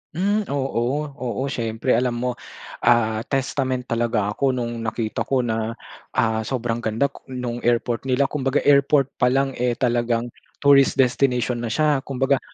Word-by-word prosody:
Hmm, 205 +4 0
oo, 135 0 -1 0.2
oo. 130 +1 -3
Siyempre, 115 0 -2
alam 120 +1 +2
mo, 125 - +1 0.5
ah, 115 -2 +3
testament 130 -1 -1
talaga 115 -3 0
ako 130 +3 0
nung 120 -1 -3
nakita 110 -1 -3
ko 130 -2 +1
na, 115 0 -2 0.4
ah, 110 -1 +1
sobrang 120 -3 -2
ganda 120 +5 0
ku - - -17
nung 125 -2 -4
airport 120 +1 0
nila. 130 +2 +2
Kumbaga 135 0 0
airport 140 -1 +4
palang, 135 +2 +2
eh, 125 -1 +1
talagang 120 -1 0 0.3
tourist 140 -1 +5
destination 125 -2 +1
na 115 - -3
siya. 150 +3 +2
Kumbaga, 135 0 +1
125 Hz, 150 wpm, -22 LUFS, 115-135 Hz, 0.5 s, tourist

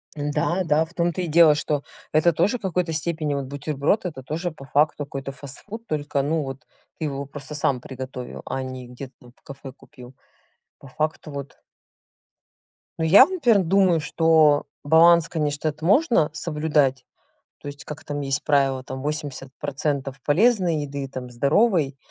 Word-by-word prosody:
Да 150 +5 -1
да, 155 0 +3
в 165 - -19
том 175 -1 0
то 185 - -3
и 175 - -2
дело, 160 -1 +6
что 150 -1 -2 0.3
это 165 +2 +3
тоже 200 +10 +1
в - - -27
какой-то 180 -3 -1
степени 155 -1 -2
вот 140 -1 -2
бутерброд, 145 +7 -1
это 150 -7 -5
тоже 165 +6 -3
по 140 -3 -13
факту 145 +1 +1
какой-то 135 -1 -6
фастфуд, 145 - -10
только 145 -2 -1
ну 155 +3 0
вот 135 +2 -8 0.3
ты 160 - -2
его 140 -1 -4
просто 140 +1 -9
сам 140 -3 0
приготовил, 130 -1 -8
а 135 - -3
не 130 -1 -7
где-то 125 +2 -9
там 120 - -16
в - - -31
кафе 140 -2 -10
купил. 125 -1 -15 0.6
По 140 - -14
факту 155 +2 -3
вот 140 -1 -7 1.4
Ну 160 - +1
я 195 +10 +8
вот, 375 - -7
например, 235 - +3
думаю, 185 -1 +3
что 160 -2 +3 0.2
баланс, 165 +2 +5
конечно, 150 -1 -2
это 155 +1 -4
можно 230 - +3
соблюдать. 150 -5 0 0.5
То - - -10
есть 145 -1 -8
как 150 +1 -8
там 145 0 -4
есть 135 -1 -1
правило- 135 -3 +2
там 130 0 -7
80 145 -2 -4
процентов 140 -1 -3
полезной 180 - +2
еды 140 -1 -5
там, 130 -2 -7
здоровой 140 - +2
150 Hz, 170 wpm, -23 LUFS, 135-165 Hz, 1.4 s, я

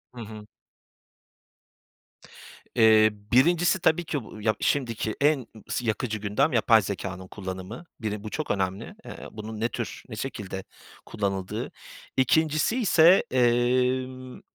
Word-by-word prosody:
Hı 120 - -7
hı. 105 -1 -9 2.3
Eee, 110 -1 +6 0.2
1’incisi 175 +8 +4
tabii 165 0 +2
ki 145 -5 -3
bu, 110 0 -11
ya, 110 0 +1
şimdiki 115 -5 -1
en 140 -4 +2 0.2
sı 125 - -2
yakıcı 110 0 -1
gündem, 110 +9 +1
yapay 115 -2 +5
zekânın 95 -1 -5
kullanımı. 95 - -7 0.2
Biri 105 -2 -3
bu 110 - -5
çok 155 +6 -3
önemli. 100 - -2
Eee, - - -8
bunun 110 0 -7
ne 115 +2 0
tür, 120 -2 -5
ne 110 - -6
şekilde 100 -5 -5 0.4
kullanıldığı. 95 -3 -3 0.5
2'ncisiyse, 160 - +4
emm. 125 +1 +1
115 Hz, 120 wpm, -26 LUFS, 105-135 Hz, 2.3 s, Eee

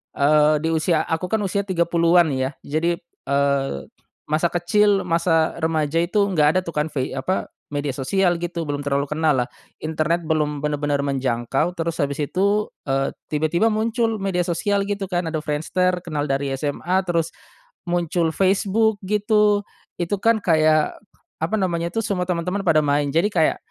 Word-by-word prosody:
eee, 150 +1 +4
di 160 - +1
usia 160 0 +1
aku 165 +3 -2
kan 220 - +1
usia 200 +1 0
30-an 170 -2 +3
ya 130 0 -1
jadi, 165 +4 0 0.3
eee, 140 0 +1 0.5
masa 155 +3 +1
kecil 195 +4 +2
masa 165 -1 +1
remaja 160 -1 0
itu 180 +5 +2
nggak 150 -5 +3
ada 185 - +5
tuh 170 - -6
kan 150 +1 +1
vei 135 -4 -3
apa 135 +8 -2 0.2
media 145 -1 -2
sosial 175 +7 +1
gitu 170 -1 -3
belum 145 -2 -3
terlalu 140 0 0
kenallah 150 -6 +1 0.3
internet 160 +2 0
belum 150 -2 -1
bener-bener 145 -1 0
menjangkau 135 +4 -1
terus 165 -1 -3
habis 140 -1 0
itu, 200 +7 +1 0.2
eee, 135 0 0 0.2
tiba-tiba 155 +7 +1
muncul 225 +1 0
media 195 -3 -1
sosial 200 +3 0
gitu 205 -1 -2
kan 175 -1 0
ada 160 - -2
Friendster 180 +5 0
kenal 155 -4 -3
dari 140 -1 -1
SMA 150 +6 -1
terus, 170 -2 0 0.6
muncul 175 -1 0
Facebook 200 +4 +2
gitu, 210 +1 +2 0.4
itu 175 +3 0
kan 230 -1 +4
kayak, 155 -4 +3 0.5
apa 175 +7 0
namanya 170 -2 -1
tuh 225 - -1
semua 180 -3 -1
teman-teman 180 +2 -2
pada 165 -3 +4
main 145 -1 +1
jadi 165 +7 +2
kayak, 160 -4 +2
165 Hz, 155 wpm, -22 LUFS, 150-185 Hz, 0.6 s, ada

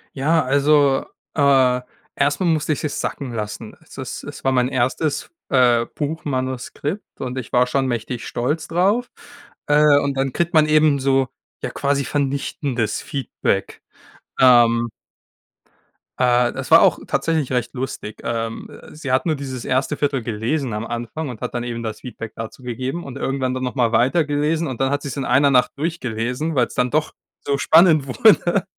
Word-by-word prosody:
Ja, 155 +4 +2
also, 140 0 +3 0.3
äh, 135 -4 +4 0.3
erst 145 0 +1
mal 185 - 0
musste 155 -2 +1
ich - - -5
es 150 - -2
sacken 135 -3 -4
lassen. 110 0 -5
Es - - -16
ist - - -6
es - - -9
war 135 - +2
mein 125 -1 +2
1, 130 +4 -1 0.2
äh, 120 -3 +4
Buchmanuskript 145 - -4
und 130 -1 -4
ich 130 - -6
war 125 0 +4
schon 135 +1 0
mächtig 120 0 -3
stolz 150 +6 -2
drauf. 200 +9 +1 0.6
Äh, 145 -1 +5
und 140 -1 -1
dann 135 -1 -1
kriegt 170 0 -1
man 155 -2 +6
eben 155 -2 +4
so, 135 -1 +2 0.3
ja, - - -2
quasi 140 0 -1
vernichtendes 135 -3 -2
Feedback. 140 -5 -3 0.6
Ähm. 120 -2 +5 1.3
Äh, 125 -1 +3
das - - -6
war - - +8
auch - - +4
tatsächlich 160 -5 0
recht 125 -2 -1
lustig. 125 -5 -5
Ähm, 115 -1 -3
äh, - - -13
sie 150 -4 -5
hat 130 - +2
nur 160 -2 +1
dieses 130 -4 -6
erste 135 +3 0
1/4 140 -3 0
gelesen 115 +4 -2
am 105 +2 -3
Anfang 120 +6 -5
und 120 -4 -8
hat - - -4
dann 120 -1 -2
eben 120 -1 -4
das 110 -2 -5
Feedback 115 -3 -8
dazu 115 +3 -8
gegeben 130 +7 -4
und 135 -1 -7
irgendwann 135 -2 -1
dann 130 0 -3
noch 125 +1 -3
mal 120 -3 +1
weitergelesen 150 +5 +1
und 130 -2 -5
dann 135 - +2
hat 145 0 0
sie's 140 -4 -5
in 135 - -2
1 140 +1 +4
Nacht 125 -2 +3
durchgelesen, 140 -1 -2
weil's 125 -3 +1
dann 125 0 0
doch 155 0 0 0.3
so 140 - +1
spannend 160 -1 +5
wurde. 200 - +3
135 Hz, 175 wpm, -21 LUFS, 125-150 Hz, 1.3 s, war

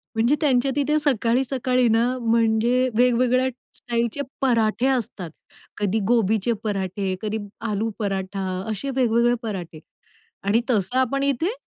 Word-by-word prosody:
म्हणजे 235 +6 +3
त्यांच्या 270 -3 +2
तिथे 290 +1 +1
सकाळी-सकाळी 255 -1 +1
ना, 225 +2 +3
म्हणजे 230 +2 +2
वेगवेगळ्या 250 +1 +3 0.3
स्टाईलचे 235 +3 -2 0.2
पराठे 235 -1 +2
असतात. 225 -9 -2 0.5
कधी 205 +1 0
गोबीचे 225 -1 +2
पराठे, 195 -2 -2
कधी 215 0 -2 0.3
आलू 215 +2 -1
पराठा 195 -2 -3 0.3
असे 215 +6 -4
वेगवेगळे 240 -1 +3
पराठे 180 -7 -5 0.6
आणि 205 +4 +2
तसं 215 +3 +1
आपण 275 +2 +1
इथे 280 - 0
235 Hz, 120 wpm, -23 LUFS, 210-255 Hz, 0.6 s, म्हणजे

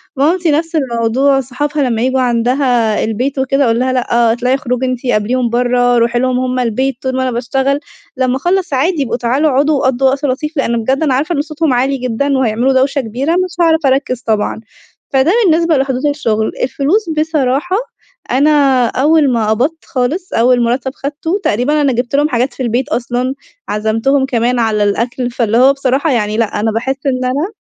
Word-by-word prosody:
مامتي 325 +4 +1
نفس 325 +2 -1
الموضوع، 265 +1 +1
صحابها 285 +3 -2
لما 230 -3 -1
ييجوا 260 +1 +1
عندها 240 -2 +1
البيت 255 +5 -2
وكده، 275 +1 +1
أقول 230 0 +1
لها: 255 0 0
"لأ، 235 -2 +1
اطلعي، 250 +2 0
أُخرجي 255 -2 -2
أنتِ، 255 0 -3
قابليهم 240 +2 0
برّا، 245 0 +2
رُوحي 235 +1 +1
لهم 255 0 0
هم 255 0 -1
البيت. 255 +3 -1
طول 260 -1 -2
ما 260 - 0
أنا 255 - -1
بأشتغل، 265 +4 -1 0.4
لما 255 -1 +1
أخلّص، 360 +1 -1
عادي، 300 +2 +1
إبقوا 240 - -2
تعالوا 260 +6 +1
اقعدوا، 290 +3 +2
وقضّوا 260 +1 +1
وقت 280 +2 -2
لطيف." 300 +4 -3
لإن 235 -4 0
بجد 270 +6 0
أنا 275 -4 +1
عارفة 310 +6 0
إن 285 - +1
صوتهم 305 -2 -1
عالي 265 +3 +1
جدًا، 260 +3 -1
وهيعملوا 250 +2 +1
دوشة 275 +2 +1
كبيرة، 255 +7 -3
مش 365 0 -1
هاعرف 320 -2 +2
أركز 265 -2 0
طبعًا. 220 0 -1 0.5
فده 270 +6 +3
بالنسبة 330 -2 +3
لحدود 265 0 -1
الشغل. 225 -7 0
الفلوس 325 - 0
بصراحة، 310 +3 0 0.5
أنا 275 -2 +3
أول 290 +2 +2
ما 220 -2 0
قبضت 275 +9 -1
خالص، 295 +9 -2
أول 245 +1 +3
مرتب 250 +3 -1
أخدته، 315 +8 -3
تقريبًا 285 +8 +1
أنا 275 -3 +2
جبت 245 +3 -2
لهم 295 +2 +2
حاجات 250 +1 -1
في 260 - -5
البيت 245 +4 -1
أصلًا، 250 0 -2 0.4
عزمتهم 225 +6 0
كمان 245 -1 0
على 215 -2 +1
الأكل. 240 +4 -1
فاللي 230 -2 0
هو، 265 +2 +5
بصراحة 275 +2 0
يعني، 215 -3 0
لأ، 215 -2 -1
أنا 220 +1 0
باحس 250 +5 -2
إن 255 -1 0
أنا 290 +11 -1
260 Hz, 180 wpm, -14 LUFS, 240-285 Hz, 0.5 s, هو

